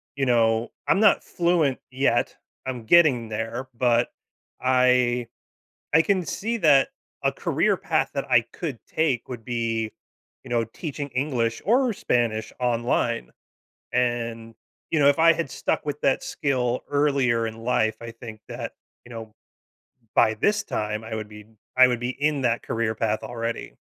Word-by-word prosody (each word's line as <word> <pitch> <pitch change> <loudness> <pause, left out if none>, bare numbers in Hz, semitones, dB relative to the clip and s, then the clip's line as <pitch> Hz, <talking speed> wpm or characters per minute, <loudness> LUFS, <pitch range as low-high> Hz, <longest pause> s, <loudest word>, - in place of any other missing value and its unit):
you 135 - 0
know, 115 -1 +2 0.2
I'm 195 - +3
not 210 - +5
fluent 170 -6 +1
yet. 130 -2 +1 0.3
I'm 125 -3 -5
getting 130 -8 +5
there. 115 +4 -4
But 120 0 +2 0.5
I 125 -2 +3 0.7
I 160 - +7
can 190 -3 +1
see 225 +9 -2
that 145 -8 +5 0.3
a - - +3
career - - +1
path - - 0
that - - -3
I 115 - +6
could 145 -9 -5
take 150 -7 0
would 120 -3 -7
be, 115 -2 -1 0.5
you - - -10
know, 120 -1 +1
teaching 145 +4 -6
English 125 -4 -1
or 245 +3 +3
Spanish 115 - -1
online. 120 - 0 0.6
And, 115 -2 -1 0.4
you 160 - +2
know, 140 - +5
if 145 - +1
I 165 0 +7
had 165 -3 -3
stuck - - -2
with 145 0 -4
that 135 - +2
skill 125 -4 -1
earlier 140 -5 +2
in 110 0 -7
life, 110 -3 +1
I 115 - -7
think 115 -2 -10
that, - - -6 0.3
you 120 - -13
know, 115 -2 -8 0.8
by 110 - +4
this 205 - +1
time, 105 +1 -3
I 110 0 -7
would 110 -1 -5
be 105 0 -12 0.3
I 130 0 +9
would 120 -1 -1
be 120 +1 -2
in 145 +1 0
that 120 -2 0
career 115 -1 -1
path 110 -1 0
already. 115 -1 -4
120 Hz, 160 wpm, -24 LUFS, 115-140 Hz, 0.8 s, I